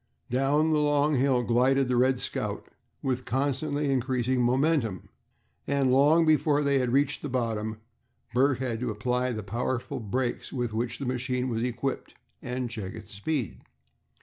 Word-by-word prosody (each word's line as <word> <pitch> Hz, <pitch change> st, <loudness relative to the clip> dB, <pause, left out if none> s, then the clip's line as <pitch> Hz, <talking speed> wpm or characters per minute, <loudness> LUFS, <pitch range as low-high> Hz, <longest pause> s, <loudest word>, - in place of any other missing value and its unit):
Down 145 Hz, +5 st, +2 dB
the 150 Hz, -, +3 dB
long 145 Hz, 0 st, +2 dB
hill 130 Hz, -1 st, +2 dB
glided 130 Hz, +3 st, +3 dB
the 125 Hz, -, +1 dB
"Red 130 Hz, +1 st, +3 dB
Scout" -, -, -2 dB, 0.4 s
with 130 Hz, -1 st, -1 dB
constantly 140 Hz, +3 st, -1 dB
increasing 130 Hz, -1 st, 0 dB
momentum, 125 Hz, -, +1 dB, 0.6 s
and 140 Hz, -2 st, +2 dB
long 150 Hz, +5 st, +5 dB
before 150 Hz, -1 st, +3 dB
they 140 Hz, -2 st, +2 dB
reached 140 Hz, +3 st, +1 dB
the 145 Hz, -, -4 dB
bottom 110 Hz, -3 st, -2 dB, 0.5 s
Bert 130 Hz, +1 st, +3 dB
had 120 Hz, -3 st, -2 dB
to 125 Hz, 0 st, -2 dB
apply 125 Hz, +4 st, -1 dB
the 110 Hz, -2 st, -4 dB
powerful 120 Hz, +5 st, -3 dB
brakes 120 Hz, +3 st, -2 dB
with 120 Hz, -4 st, -2 dB
which 115 Hz, +2 st, -2 dB
the 140 Hz, -, -5 dB
machine 125 Hz, 0 st, -1 dB
was 115 Hz, -1 st, -1 dB
equipped, 125 Hz, +2 st, -3 dB, 0.3 s
and 125 Hz, 0 st, -3 dB
check 110 Hz, -3 st, -6 dB
its 110 Hz, -2 st, -10 dB
speed. 115 Hz, -, -3 dB
130 Hz, 150 wpm, -27 LUFS, 120-140 Hz, 0.6 s, long